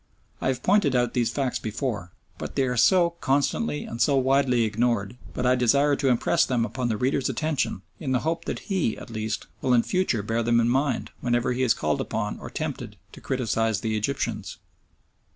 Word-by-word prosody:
I -, -, 0 dB
have 130 Hz, -1 st, -1 dB
pointed 185 Hz, -9 st, +3 dB
out 120 Hz, -1 st, +1 dB
these 120 Hz, -2 st, +1 dB
facts 135 Hz, -3 st, -1 dB
before, 105 Hz, -4 st, -3 dB, 0.3 s
but -, -, -6 dB
they 135 Hz, -, +2 dB
are 125 Hz, -1 st, 0 dB
so 170 Hz, +7 st, +4 dB
constantly 145 Hz, +5 st, 0 dB
and 115 Hz, -, -6 dB
so 140 Hz, -2 st, +4 dB
widely 130 Hz, -2 st, +3 dB
ignored 110 Hz, -1 st, 0 dB, 0.2 s
that 125 Hz, -, -1 dB
I 125 Hz, -, +5 dB
desire 140 Hz, +4 st, +3 dB
to 140 Hz, -, 0 dB
impress 130 Hz, +7 st, +3 dB
them 120 Hz, -3 st, +1 dB
upon 120 Hz, +3 st, -3 dB
the 110 Hz, -, 0 dB
reader's 130 Hz, +3 st, 0 dB
attention 150 Hz, -11 st, -1 dB, 0.2 s
in 135 Hz, -4 st, -3 dB
the 130 Hz, -1 st, +2 dB
hope 165 Hz, +1 st, -2 dB
that -, -, -4 dB
he, 180 Hz, -, +1 dB
at -, -, -10 dB
least, 110 Hz, 0 st, -3 dB, 0.2 s
will 125 Hz, -1 st, +3 dB
in 115 Hz, -, +4 dB
future 180 Hz, -, 0 dB
bear 115 Hz, +2 st, 0 dB
them 115 Hz, 0 st, +3 dB
in 115 Hz, 0 st, +2 dB
mind 135 Hz, +1 st, 0 dB
whenever 120 Hz, 0 st, +1 dB
he 125 Hz, -, -2 dB
is 125 Hz, -3 st, +3 dB
called 75 Hz, -2 st, -1 dB
upon -, -, -3 dB
or -, -, -8 dB
tempted -, -, -5 dB, 0.2 s
to -, -, -13 dB
criticise 115 Hz, -5 st, 0 dB
the 110 Hz, -1 st, -1 dB
Egyptians. 120 Hz, +6 st, -2 dB
125 Hz, 200 wpm, -25 LUFS, 115-140 Hz, 0.3 s, I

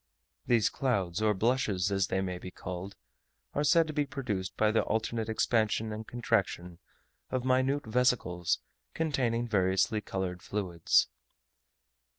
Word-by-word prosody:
These 115 Hz, -3 st, +4 dB
clouds, 100 Hz, -8 st, -1 dB
or 105 Hz, -1 st, +3 dB
blushes 105 Hz, -4 st, +1 dB
as 95 Hz, -2 st, +1 dB
they 95 Hz, 0 st, 0 dB
may 90 Hz, -2 st, -3 dB
be 90 Hz, -, -7 dB
called, 90 Hz, +2 st, -7 dB, 0.6 s
are 145 Hz, -, 0 dB
said 165 Hz, +3 st, +5 dB
to 155 Hz, -, -6 dB
be 145 Hz, -1 st, 0 dB
produced 105 Hz, -10 st, -4 dB
by 110 Hz, 0 st, +3 dB
the 110 Hz, -, +3 dB
alternate 110 Hz, 0 st, -1 dB
expansion 110 Hz, -1 st, +1 dB
and 110 Hz, +1 st, -7 dB
contraction 90 Hz, -7 st, -1 dB, 0.5 s
of 130 Hz, -1 st, -2 dB
minute 130 Hz, +2 st, +2 dB
vesicles 110 Hz, -7 st, +1 dB, 0.3 s
containing 125 Hz, -7 st, 0 dB
variously 100 Hz, +1 st, +2 dB
coloured 95 Hz, -3 st, -4 dB
fluids. 90 Hz, -6 st, +1 dB
110 Hz, 135 wpm, -30 LUFS, 95-125 Hz, 0.6 s, said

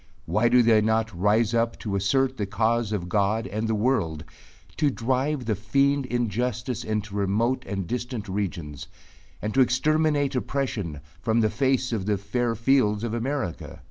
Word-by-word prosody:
Why 105 Hz, +7 st, +2 dB
do 125 Hz, 0 st, +5 dB
they 110 Hz, -2 st, +5 dB
not 110 Hz, 0 st, +1 dB
rise 105 Hz, +5 st, +2 dB
up 115 Hz, 0 st, +1 dB
to 105 Hz, -4 st, -3 dB
assert 130 Hz, +7 st, +1 dB
the 105 Hz, -, -2 dB
cause 110 Hz, +1 st, 0 dB
of 95 Hz, -5 st, -2 dB
God 105 Hz, +3 st, +1 dB
and 110 Hz, +2 st, -3 dB
the 110 Hz, -, +1 dB
world, 105 Hz, -, 0 dB, 0.5 s
to 150 Hz, -2 st, +3 dB
drive 130 Hz, +2 st, -1 dB
the 110 Hz, -, +1 dB
fiend 140 Hz, +6 st, +1 dB
injustice 120 Hz, 0 st, -2 dB
into 105 Hz, -1 st, -3 dB
remote 105 Hz, +6 st, 0 dB
and 95 Hz, -1 st, -3 dB
distant 120 Hz, 0 st, -4 dB
regions, 85 Hz, -8 st, -4 dB, 0.6 s
and 105 Hz, 0 st, -2 dB
to 135 Hz, -, +4 dB
exterminate 145 Hz, +2 st, +2 dB
oppression 115 Hz, -, -2 dB, 0.2 s
from 110 Hz, +3 st, +2 dB
the 110 Hz, -1 st, +2 dB
face 130 Hz, +1 st, +1 dB
of 100 Hz, -3 st, -2 dB
the 105 Hz, -1 st, +2 dB
fair 115 Hz, +4 st, -1 dB
fields 115 Hz, -3 st, +2 dB
of 115 Hz, -2 st, -2 dB
America? 120 Hz, -, -3 dB
115 Hz, 165 wpm, -25 LUFS, 105-125 Hz, 0.6 s, do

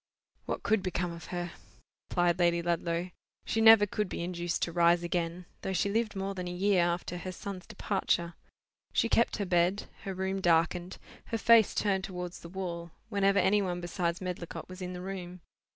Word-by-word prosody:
"What -, -, -3 dB
could 215 Hz, 0 st, +2 dB
become 180 Hz, -1 st, -2 dB
of 170 Hz, -1 st, -9 dB
her?" 175 Hz, -1 st, -4 dB, 0.6 s
replied 175 Hz, 0 st, +2 dB
Lady 170 Hz, -1 st, +3 dB
Ludlow. 170 Hz, +1 st, -1 dB, 0.3 s
"She 225 Hz, -, 0 dB
never 220 Hz, -2 st, +9 dB
could 210 Hz, -1 st, -2 dB
be -, -, -4 dB
induced 175 Hz, -1 st, -2 dB
to 170 Hz, -, -1 dB
rise 170 Hz, 0 st, +4 dB
again, 175 Hz, 0 st, -2 dB, 0.2 s
though 190 Hz, -, -2 dB
she 200 Hz, +2 st, +1 dB
lived 220 Hz, -1 st, 0 dB
more 195 Hz, +1 st, -2 dB
than 180 Hz, -2 st, -5 dB
a -, -, -3 dB
year 190 Hz, +1 st, +2 dB
after 175 Hz, 0 st, -1 dB
her 185 Hz, -, -5 dB
son's 185 Hz, 0 st, -7 dB
departure. 190 Hz, -4 st, -1 dB, 0.6 s
She -, -, +3 dB
kept 235 Hz, +1 st, +2 dB
her 200 Hz, -, -1 dB
bed; 180 Hz, +2 st, +2 dB, 0.2 s
her 195 Hz, -1 st, -3 dB
room 190 Hz, +1 st, -2 dB
darkened, 175 Hz, +1 st, +2 dB, 0.3 s
her 230 Hz, -, -2 dB
face 230 Hz, -1 st, +5 dB
turned 195 Hz, -2 st, +1 dB
towards 180 Hz, -2 st, -5 dB
the 170 Hz, -, -10 dB
wall, 170 Hz, -2 st, -5 dB, 0.2 s
whenever 200 Hz, -2 st, +2 dB
any 205 Hz, +1 st, +4 dB
one 180 Hz, -2 st, -2 dB
besides 175 Hz, 0 st, -2 dB
Medlicott 180 Hz, -2 st, -5 dB
was 185 Hz, +1 st, -10 dB
in 180 Hz, 0 st, -4 dB
the 180 Hz, -, -6 dB
room. 180 Hz, -2 st, -6 dB
180 Hz, 185 wpm, -30 LUFS, 175-195 Hz, 0.6 s, never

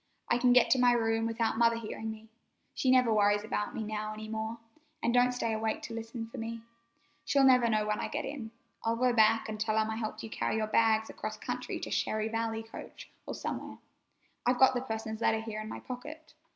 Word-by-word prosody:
I 240 Hz, -, +3 dB
can 250 Hz, 0 st, +4 dB
get 250 Hz, 0 st, +5 dB
to 260 Hz, -, +5 dB
my 245 Hz, -1 st, +5 dB
room 225 Hz, -1 st, +1 dB
without 225 Hz, 0 st, 0 dB
Mother 230 Hz, 0 st, +5 dB
hearing 220 Hz, -1 st, -5 dB
me. 220 Hz, 0 st, -8 dB, 0.5 s
She 260 Hz, -, 0 dB
never 250 Hz, -3 st, +5 dB
worries 205 Hz, 0 st, +3 dB
about 210 Hz, -1 st, -3 dB
me 220 Hz, -, -2 dB
now 215 Hz, 0 st, -3 dB
any 215 Hz, 0 st, -7 dB
more, 220 Hz, +1 st, -3 dB, 0.5 s
an' 235 Hz, -, +2 dB
don't 245 Hz, +1 st, +4 dB
stay 230 Hz, -2 st, -1 dB
awake 220 Hz, 0 st, -2 dB
to 230 Hz, -, -6 dB
listen 230 Hz, 0 st, -5 dB
for 225 Hz, -, -9 dB
me. 230 Hz, 0 st, -5 dB, 0.6 s
She'll 280 Hz, -1 st, +3 dB
never 250 Hz, -3 st, +6 dB
know 215 Hz, -1 st, +2 dB
when 210 Hz, 0 st, -1 dB
I -, -, -2 dB
get 295 Hz, +1 st, -3 dB
in. 265 Hz, -6 st, -5 dB, 0.3 s
I'll 225 Hz, 0 st, +1 dB
go 250 Hz, +1 st, +2 dB
back 225 Hz, 0 st, +4 dB
an' 215 Hz, -1 st, -5 dB
tell 215 Hz, 0 st, 0 dB
'em 220 Hz, 0 st, +1 dB
I 220 Hz, -, -3 dB
helped 220 Hz, 0 st, -4 dB
carry -, -, -1 dB
your 220 Hz, -1 st, +1 dB
bag 220 Hz, 0 st, +3 dB
across -, -, -5 dB
country -, -, -4 dB
to -, -, -5 dB
Cherry 215 Hz, 0 st, 0 dB
Valley 225 Hz, 0 st, -2 dB
coach, 225 Hz, -, -11 dB, 0.2 s
or -, -, -4 dB
somewhere. -, -, -5 dB, 0.7 s
I've 245 Hz, +1 st, +2 dB
got 265 Hz, 0 st, +6 dB
the 245 Hz, -, -1 dB
parson's 220 Hz, -2 st, -4 dB
letter 220 Hz, -1 st, +3 dB
here 220 Hz, -1 st, -5 dB
in 215 Hz, -, -7 dB
my -, -, -6 dB
pocket. 300 Hz, +6 st, -8 dB
225 Hz, 220 wpm, -31 LUFS, 220-245 Hz, 0.7 s, never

